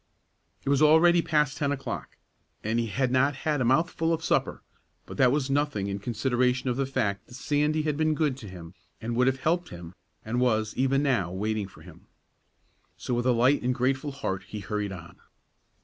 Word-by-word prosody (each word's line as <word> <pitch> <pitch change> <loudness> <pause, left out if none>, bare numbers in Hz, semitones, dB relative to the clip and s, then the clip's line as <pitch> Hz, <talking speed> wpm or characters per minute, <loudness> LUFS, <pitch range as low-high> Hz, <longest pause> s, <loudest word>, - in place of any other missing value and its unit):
It - - -1
was 140 0 +3
already 165 +3 +6
past 150 -3 +1
ten 145 -1 0
o'clock, 135 -1 -5 0.5
and 110 +2 0
he 115 - -1
had 125 +3 0
not 135 +2 +3
had 150 +1 -1
a - - +1
mouthful 165 +5 +2
of 165 -1 -1
supper, - - 0 0.4
but - - -9
that 130 -2 +5
was 140 -1 0
nothing 140 -7 0
in 100 0 -3
consideration 125 +3 0
of - - -2
the 135 +1 -1
fact 110 -7 -2
that 120 - -12
Sandy 150 +3 0
had 150 -2 -1
been 155 0 +2
good 150 -4 +1
to 110 - -10
him, 90 -2 -10 0.3
and 115 +1 -4
would 125 +2 +3
have 130 0 0
helped 175 +4 0
him, 85 0 -10 0.3
and 120 +3 -1
was, 110 -3 +1
even 135 +2 +2
now, 115 -11 +1
waiting 105 +2 -2
for - - -17
him. - - -15 0.9
So, - - -4
with 120 +1 0
a - - +5
light 125 +4 +3
and 125 0 0
grateful 135 +3 0
heart, 95 -9 -4
he 105 -1 -6
hurried 105 0 -3
on. 85 -3 -10
130 Hz, 200 wpm, -27 LUFS, 110-145 Hz, 0.9 s, already